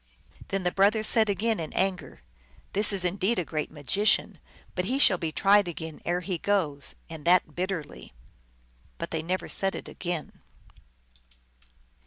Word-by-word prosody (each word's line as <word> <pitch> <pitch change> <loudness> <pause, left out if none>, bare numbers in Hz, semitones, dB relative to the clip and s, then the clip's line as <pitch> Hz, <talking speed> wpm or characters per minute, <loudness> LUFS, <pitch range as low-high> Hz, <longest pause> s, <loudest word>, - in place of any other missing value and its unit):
Then 195 -1 -2
the 180 - +1
brothers 210 +3 +3
said 220 -1 +4
again 215 +2 0
in 160 -2 -5
anger, 190 -1 -2 0.2
" - - -30
This 205 +2 +2
is 190 -2 -1
indeed 195 +5 0
a 180 - -1
great 155 -1 -3
magician. 165 +8 +1 0.4
Yet 180 - -1
he 255 +7 0
shall 195 -10 +5
be 160 -2 -2
tried 200 +3 +4
again 160 -2 -6
ere 175 +1 0
he 180 -1 -3
goes, 160 -9 -1
and 160 -2 -8
that 175 -3 +4
bit 185 +4 -2
terly." 160 -7 -6 0.9
But - - -5
they 160 - -1
never 180 +3 -2
said 195 0 +2
it - - -7
again. 175 -4 -5
180 Hz, 165 wpm, -27 LUFS, 160-200 Hz, 0.9 s, shall